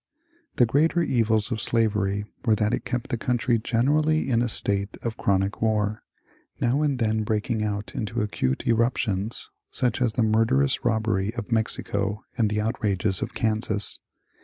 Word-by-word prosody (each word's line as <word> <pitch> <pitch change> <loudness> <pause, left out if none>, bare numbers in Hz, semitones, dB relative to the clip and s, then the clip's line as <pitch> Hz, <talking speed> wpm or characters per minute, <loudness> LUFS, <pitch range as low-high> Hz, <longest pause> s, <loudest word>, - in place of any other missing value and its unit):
The 120 - +5
greater 160 +8 +2
evils 110 -6 +2
of 110 -3 -1
slavery 105 -2 +1 0.2
were 110 -4 +3
that 105 +2 0
it - - -2
kept 120 -1 -3
the 120 - -1
country 120 0 +1
generally 145 +6 +1
in 115 -1 +3
a 120 - 0
state 100 -1 -1
of 115 -2 -2
chronic 95 0 0
war, 105 -1 +1 0.6
now 125 +5 +1
and 145 -3 +1
then 110 -2 +1
breaking 110 +1 -1
out 105 -2 -3
into 115 +1 -2
acute 65 -11 -1
eruptions, 115 -3 0 0.2
such 125 0 -1
as 120 -3 +2
the 120 - +1
murderous 115 +5 +2
robbery 110 -2 0
of 120 0 -6
Mexico 105 -2 -1
and 115 -4 +2
the 105 0 -1
outrages 105 -4 0
on - - 0
Kansas. 110 -2 0
110 Hz, 160 wpm, -25 LUFS, 105-120 Hz, 0.6 s, The